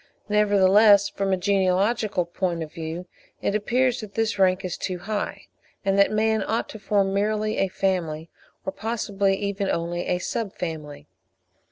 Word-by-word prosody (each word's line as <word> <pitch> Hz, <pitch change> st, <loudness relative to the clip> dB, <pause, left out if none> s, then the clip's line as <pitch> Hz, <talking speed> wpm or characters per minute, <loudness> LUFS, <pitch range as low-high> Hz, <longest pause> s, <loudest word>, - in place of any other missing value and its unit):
Nevertheless, 205 Hz, 0 st, +5 dB
from 195 Hz, -1 st, -2 dB
a 190 Hz, -, +2 dB
genealogical 195 Hz, +1 st, +1 dB
point 170 Hz, -1 st, -2 dB
of 155 Hz, -, -10 dB
view 165 Hz, +2 st, -5 dB, 0.3 s
it -, -, -1 dB
appears 245 Hz, +4 st, +1 dB
that 210 Hz, -2 st, -10 dB
this 225 Hz, -2 st, 0 dB
rank 185 Hz, 0 st, +3 dB
is 180 Hz, -, -3 dB
too 185 Hz, -2 st, -3 dB
high, 205 Hz, +4 st, -4 dB, 0.4 s
and 195 Hz, 0 st, +2 dB
that 200 Hz, -, +6 dB
man 220 Hz, 0 st, +1 dB
ought 225 Hz, +3 st, -1 dB
to 220 Hz, -, -9 dB
form 195 Hz, -1 st, +1 dB
merely 215 Hz, +2 st, 0 dB
a 195 Hz, -, +2 dB
Family, 175 Hz, -5 st, -1 dB, 0.4 s
or 190 Hz, -, -1 dB
possibly 200 Hz, -2 st, -1 dB
even 200 Hz, 0 st, -2 dB
only 170 Hz, +1 st, -2 dB
a 180 Hz, -, +1 dB
Sub 200 Hz, +2 st, -3 dB
family. 155 Hz, -4 st, -6 dB
195 Hz, 160 wpm, -24 LUFS, 180-210 Hz, 0.4 s, that